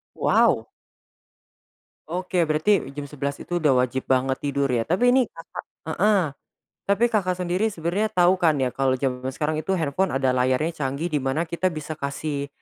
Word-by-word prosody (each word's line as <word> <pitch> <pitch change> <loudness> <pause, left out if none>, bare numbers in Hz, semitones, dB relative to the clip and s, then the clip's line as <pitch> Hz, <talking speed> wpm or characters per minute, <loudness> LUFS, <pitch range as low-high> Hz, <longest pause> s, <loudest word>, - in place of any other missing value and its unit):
Wow. - - +3 1.4
Oke 180 +2 -3
berarti 155 +6 +3 0.2
jam 145 - -4
11.00 140 0 -4
itu 175 0 -3
udah 135 -5 +3
wajib 130 +1 -3
banget 130 0 +1
tidur 140 -1 -1
ya? 115 0 0
Tapi 235 +9 +3
ini 255 -2 +3
Kakak 165 - -9 0.3
heeh, 205 +5 +3 0.7
tapi 200 +4 +2
Kakak 185 -5 +1
sendiri 180 +4 0
sebenarnya 185 +2 -1
tahu 185 -3 +3
kan 165 -4 +3
ya 125 - 0
kalo 135 0 +1
jaman 130 -1 -2
sekarang 155 0 -1
itu 190 +4 -1
handphone 165 +2 0
ada 135 -1 +2
layarnya 130 +5 +1
canggih 140 +5 -2
di 150 - +1
mana 135 +4 0
kita 170 +2 -1
bisa 155 -2 -5
kasih 140 0 -3
155 Hz, 165 wpm, -24 LUFS, 135-180 Hz, 1.4 s, Wow